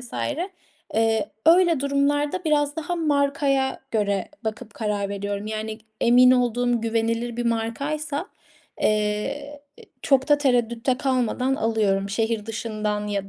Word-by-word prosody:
vs. 245 -2 -11 0.8
eee, 225 -1 +1 0.2
öyle 340 -3 +5
durumlarda 290 +4 0
biraz 290 -2 +1
daha 325 +2 -3
markaya 280 -3 +1
göre 200 -3 0 0.2
bakıp 220 0 -5
karar 205 -2 -2
veriyorum. 200 +1 -4
Yani, 215 0 -4 0.2
emin 250 +1 +6
olduğum 245 -1 +2
güvenilir 230 +1 -1
bir 240 0 -1
markaysa, 280 - -2 0.6
eee, 215 +8 -1 0.4
çok 270 -1 +2
da 295 - +5
tereddütte 245 -2 +1
kalmadan 260 0 0
alıyorum. 205 -4 0
Şehir 225 0 -1
dışından 215 -2 -3
ya 200 -1 -3
235 Hz, 115 wpm, -24 LUFS, 215-280 Hz, 0.8 s, emin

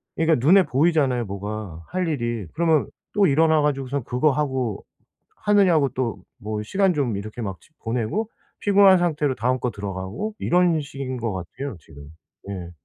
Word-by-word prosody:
그러니까 160 -6 +2
눈에 190 +4 +7
보이잖아요 140 -4 +2
뭐가 100 -3 -6
할 180 -1 -2
일이. 120 - -2
그러면 160 -3 +2 0.2
또 205 -1 +4
일어나 155 +1 +4
가지고선 140 -2 -1
그거 125 +6 +2
하고 130 -7 -2 0.5
하느냐고 185 -9 +3
또 120 -6 -2 0.2
뭐 105 0 -3
시간 190 - +2
좀 125 -9 -1
이렇게 110 +4 -6
막 95 -4 -5
집 155 - -25
보내고 120 - -2 0.3
피곤한 200 -2 +6
상태로 150 -6 0
다음 125 +2 0
거 125 - -1
들어가고 100 - -5
이런 175 -2 +3
식인 135 -2 -5
것 115 -4 -2
같아요 110 +9 -6
지금. 70 -2 -14 0.4
예. 90 -3 -5
130 Hz, 335 characters per minute, -23 LUFS, 110-160 Hz, 0.5 s, 눈에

